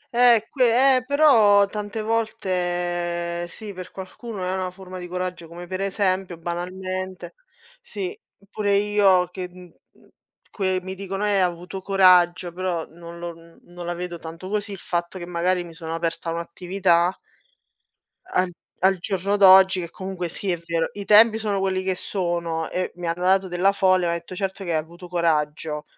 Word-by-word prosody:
Eh 240 -3 +5
que 255 +1 +5
eh, 255 - -2
però 225 -9 +6
tante 210 +1 -5
volte 175 -5 -1
sì, 210 +2 -8
per 185 0 -8
qualcuno 195 +1 -7
è 185 - -1
una 185 -1 -2
forma 185 0 -10
di 180 - -7
coraggio, 180 -1 -4
come 175 +2 -9
pre 190 +2 -2
esempio 190 -3 -1
banalmente. 185 - -5 0.5
Sì, 420 -4 -5 0.4
pure 205 -2 +1
io 200 -3 +3
che, 180 0 -6
mhmm, 180 -1 -14 0.8
que 190 -2 0
mi 190 0 -5
dicono: 195 +1 -4
"Eh, 210 - +1
hai 195 - +3
avuto 180 +1 -2
coraggio", 180 -2 +4
però 180 -2 -2
non 170 +1 -11
lo 170 0 -6
n 165 0 -18
non 175 0 -9
la 175 - -2
vedo 175 -1 -5
tanto 165 +4 -8
così, 205 0 -2
il 195 - -6
fatto 175 +1 -3
che 175 - -6
magari 175 +1 0
mi 170 -1 -11
sono 165 0 -5
aperta 165 0 -3
un'attività 175 +1 0 1.1
al 180 0 +1 0.3
al 190 -1 +4
giorno 200 +2 -1
d'oggi 190 -1 +7
che 170 -2 -5
comunque 185 -1 -5
sì 190 +3 -3
è 175 - 0
vero, 165 -1 0
i 200 -1 -7
tempi 220 +1 +7
sono 205 -3 -1
quelli 185 -1 0
che 190 -1 0
sono 170 -4 -2
e 185 0 -2
mi 175 -1 -5
hanno 170 +2 -2
dato 190 +1 +3
della 180 +2 +2
folle, 185 -2 +3
mi 175 - 0
hanno 170 - 0
detto:" 170 +2 -10
Certo 195 +1 -3
che 170 - -2
hai 160 - +2
avuto 170 +3 -7
coraggio." 155 -3 -1
185 Hz, 175 wpm, -23 LUFS, 175-195 Hz, 1.1 s, d'oggi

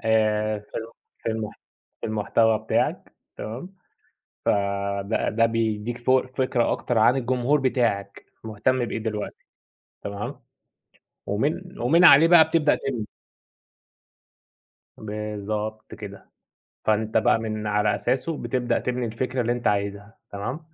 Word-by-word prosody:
آآ، 110 -1 +2
في 105 - -17 0.6
في - - -2
الم 110 -1 -3 0.5
في - - -3
المحتوى 110 +1 +2
بتاعك - - -1 0.2
تمام، 130 - -7 0.7
فده 100 +1 0
ده 115 +1 +3
بيدّيك 115 0 -1
ف 120 +1 -4
فكرة 130 -1 +1
أكتر 120 - -1
عن 115 +4 +5
الجمهور 130 +3 +1
بتاعك 115 -7 0 0.2
مهتم 115 +4 0
بإيه - - -4
دلوقتي، 110 -2 -5 0.6
تمام، 100 0 -5 0.9
ومن 155 - -2
ومن 160 +9 +4
عليه 160 0 +9
بقى 165 -2 +7
بتبدأ 160 -2 +3
تبني. 120 -6 -4 1.9
بالضبط 105 0 -5
كده، 100 -2 -10 0.5
فأنت 110 +1 +1
بقى - - +4
من 110 -1 -4
على 105 0 +2
أساسه 140 +5 -1
بتبدأ 125 -4 -1
تبني 125 -1 -2
الفكرة 125 +3 -2
اللي 120 0 +1
أنت 120 0 -4
عايزها، 100 +1 -1 0.2
تمام، 100 +9 -4
110 Hz, 120 wpm, -25 LUFS, 105-125 Hz, 1.9 s, عليه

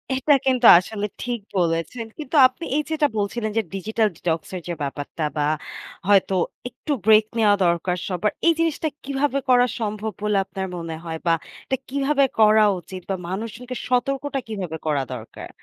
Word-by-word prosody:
এটা 265 +3 +3
কিন্তু 255 -2 +2
আসলে 205 +2 -4 0.2
ঠিক 245 -2 -2 0.2
বলেছেন। 170 +7 -1
কিন্তু 305 0 -5
আপনি 295 +6 -9
এই 300 - +2
যেটা 310 -2 +2
বলছিলেন 215 +2 -1
যে - - +4
digital 215 +3 0
detox 165 -2 -1
এর 180 - -4
যে 175 - -2
ব্যাপারটা 145 +3 -4
বা 145 - +2 0.6
হয়তো 195 -1 +4 0.3
একটু 250 +5 -7
ব্রেক 215 0 +6
নেয়া 210 -2 +5
দরকার 175 +1 +1
সবার। 195 +3 0 0.2
এই 335 - +6
জিনিসটা 325 -1 0 0.2
কিভাবে 275 0 0
করা 245 -1 +6
সম্ভব 215 0 -3
বলে 210 -1 +2
আপনার 190 -1 -5
মনে 165 -1 -5
হয় 160 -1 -4
বা 165 - +5 0.3
এটা 265 - -1
কিভাবে 280 +1 +2 0.2
করা 215 0 +6
উচিত 185 +1 -9
বা 195 - +1
মানুষজনকে 230 +5 -5
সতর্কটা 270 +3 0
কিভাবে 185 -7 -4
করা 145 -3 +1
দরকার? - - -9
215 Hz, 165 wpm, -23 LUFS, 185-255 Hz, 0.6 s, ব্রেক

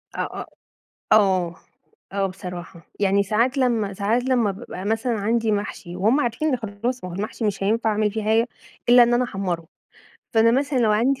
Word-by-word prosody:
آآ، - - -1 0.2
آآ، - - -7 0.7
آه، 185 -5 +3 0.6
آه 195 0 +1
بصراحة 180 -3 -8
يعني 200 0 +3
ساعات 235 +7 +1
لمّا 230 -6 +1
ساعات 215 +5 +1
لمّا 250 -5 +2
بابقى 195 -2 -7
مثلًا 225 +4 0
عندي 225 +1 +1
محشي 200 -3 -4
وهُم 220 +10 +3
عارفين 245 +4 0
نخلّصه، 240 0 -3
ما - - -8
هو - - -6
المحشي 215 +3 -4
مش 205 -2 -1
هينفع 220 +3 +1
أعمل 210 0 +1
فيه 220 0 -4
حاجة 225 +3 +2 0.4
إلّا 245 0 +8
إن 240 0 +4
أنا 245 +1 +2
احمّره، 185 -7 -3 0.7
فأنا 225 +1 +5
مثلًا 270 +2 +1
لو 225 -3 +3
عندي 255 +6 +2
220 Hz, 175 wpm, -23 LUFS, 200-240 Hz, 0.7 s, إلّا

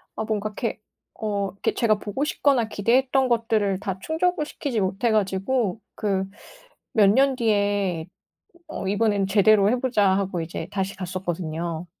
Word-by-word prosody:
아 220 - -2
뭔가 215 -1 -2
이렇게 225 +1 -4 0.4
어 200 -2 -2
이렇게 200 - -2
제가 215 -3 +2
보고 210 +7 -3
싶거나 270 -6 +2
기대했던 255 +5 +2
것들을 220 -4 +1
다 195 -2 -4
충족을 320 - 0
시키지 260 -8 -3
못해 195 +5 0
가지고 210 +2 0 0.2
그 195 -3 -1 0.7
몇 210 -3 +5
년 270 +5 +4
뒤에 205 -7 0 0.6
'어. 305 -11 -5
이번엔 205 -1 +1
제대로 205 0 +5
해 250 +2 +1
보자.' 225 -6 +2
하고 190 -3 -2
이제 160 0 -5
다시 195 -1 -2
갔었거든요. 175 -3 -4
205 Hz, 310 characters per minute, -24 LUFS, 190-230 Hz, 0.7 s, 몇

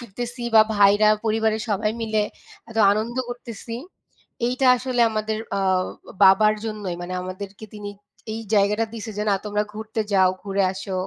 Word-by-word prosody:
ফিরতেছি 240 +2 -6
বা 220 - +9 0.2
ভাইরা, 205 +1 +5 0.2
পরিবারের 220 0 +1
সবাই 210 +1 +1
মিলে 215 -1 +1 0.5
এত 225 - -10 0.2
আনন্দ 220 +4 -2
করতেসি, 235 -1 -7 0.7
এইটা 255 +2 +1
আসলে 250 0 -2
আমাদের 215 0 -2 0.2
আ - - 0 0.6
বাবার 200 +3 +6
জন্যই। 210 -5 -4
মানে 180 +1 -5
আমাদেরকে 195 +3 -7
তিনি 205 -1 -6 0.4
এই 220 - -4
জায়গাটা 210 +2 +3
দিছে 225 0 -6
যে, - - 0
না, - - +4
তোমরা 210 0 0
ঘুরতে 220 +1 -4
যাও, 190 -2 +5
ঘুরে 195 0 0
আসো। 190 0 -7
215 Hz, 150 wpm, -23 LUFS, 200-225 Hz, 0.7 s, বা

